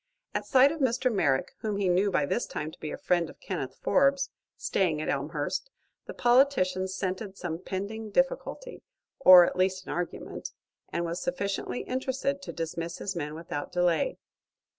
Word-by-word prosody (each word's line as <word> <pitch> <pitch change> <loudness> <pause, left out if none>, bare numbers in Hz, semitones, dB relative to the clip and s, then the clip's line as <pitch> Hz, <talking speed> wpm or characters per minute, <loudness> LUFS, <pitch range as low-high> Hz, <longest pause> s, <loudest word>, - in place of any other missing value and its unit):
At - - -2
sight 265 +2 +6
of 320 - -5
Mr. 255 -2 +1
Merrick, 140 -9 +1
whom 210 -2 -2
he 200 -2 +1
knew 185 +3 +3
by 150 -6 +1
this - - -1
time 150 +1 -4
to - - -16
be 155 - -5
a - - -5
friend 175 -2 +1
of - - -14
Kenneth - - -4
Forbes, 275 0 +3 0.3
staying 170 -6 0
at 155 - -3
Elmhurst, 145 - -2 0.4
the - - -6
politician 240 -8 +3
scented 190 +1 -4
some 165 -2 -4
pending 205 +4 -5
difficulty, 270 - -1 0.4
or 185 -8 +10
at - - -3
least 185 0 +1
an - - -6
argument, 175 0 -5 0.4
and 170 - -1
was 170 +1 -3
sufficiently 200 - -2
interested 265 +2 -2
to - - -6
dismiss 165 +1 -4
his 195 -1 -4
men 150 -2 -4
without 160 -3 -5
delay. 175 -2 +1
185 Hz, 170 wpm, -28 LUFS, 170-250 Hz, 0.4 s, or